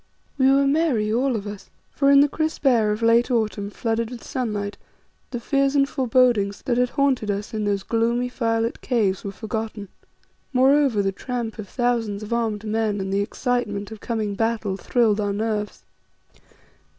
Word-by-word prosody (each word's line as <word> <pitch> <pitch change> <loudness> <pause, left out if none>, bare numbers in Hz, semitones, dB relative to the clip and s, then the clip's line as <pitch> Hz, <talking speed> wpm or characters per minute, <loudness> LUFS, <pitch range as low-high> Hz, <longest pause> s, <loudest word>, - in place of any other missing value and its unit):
We 265 -1 +4
were 275 +1 +4
merry, 275 -8 +1
all 255 +2 +1
of 210 -2 -4
us, 205 -1 -8 0.2
for 275 -1 +2
in 280 0 +7
the 290 - +5
crisp 315 +1 -3
air 230 -5 +4
of 210 +2 -3
late 230 +2 +4
autumn 215 -4 -1
flooded 225 +1 -2
with 245 -1 -9
sunlight, 210 -6 -3 0.5
the 245 - -4
fears 275 +3 +1
and 275 -1 +4
forebodings 245 -7 +2
that 245 -1 0
had 250 0 +2
haunted 265 -6 +1
us 205 +3 -3
in 215 -1 -2
those 200 -1 0
gloomy, 235 +2 0
firelit 230 -2 -1
caves 215 -7 0
were 200 - -4
forgotten. 220 0 -5 0.6
Moreover, 265 -4 +4
the 195 - +1
tramp 235 +1 -5
of 200 -3 -7
thousands 230 -4 -1
of 215 - -4
armed 220 -3 -1
men 215 -1 0
and 190 0 -3
the 200 - +2
excitement 210 -2 -2
of 220 - -8
coming 215 -3 -2
battle 225 -2 -1
thrilled 215 0 +1
our 205 -1 -1
nerves. 210 -1 -3
225 Hz, 175 wpm, -23 LUFS, 210-250 Hz, 0.6 s, in